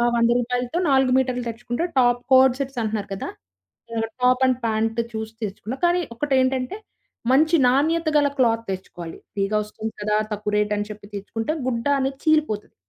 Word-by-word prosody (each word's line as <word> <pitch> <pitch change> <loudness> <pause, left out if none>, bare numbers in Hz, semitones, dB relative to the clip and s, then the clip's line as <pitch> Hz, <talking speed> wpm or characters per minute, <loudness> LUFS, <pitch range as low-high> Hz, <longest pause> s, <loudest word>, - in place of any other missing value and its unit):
100 235 0 +3
రూపాయలతో 245 +4 -2
4 265 -2 +4
మీటర్లు 255 -1 0
తెచ్చుకుంటే 240 +7 -3
టాప్ 245 -1 +3
కోడ్ 260 -1 +6
సెట్స్ 270 -2 -3
అంటున్నారు 215 -2 -3
కదా 195 - -5 0.9
టాప్ 255 +1 +4
అండ్ 255 -1 +2
ప్యాంట్ 225 +1 0
చూసి 220 0 -5
తెచ్చుకున్నా. 210 +5 -6
కానీ 350 +1 +3
ఒకటి 285 +3 -1
ఏంటంటే 260 +6 -1 0.5
మంచి 310 +5 +4
నాణ్యత 315 +6 +2
గల 290 -1 +4
క్లాత్ 230 -3 +2
తెచ్చుకోవాలి. 175 -3 -7 0.2
ఫ్రీగా 200 +1 0
వస్తుంది 220 +1 -6
కదా 210 0 +1 0.2
తక్కువ 210 0 -3
రేటని 210 0 0
చెప్పి 210 0 -12
తెచ్చుకుంటే 225 +6 -3 0.2
గుడ్డ 235 -2 -2
అనేది 270 0 -2
చీలిపోతది. 305 -10 +1
240 Hz, 155 wpm, -23 LUFS, 215-265 Hz, 0.9 s, కోడ్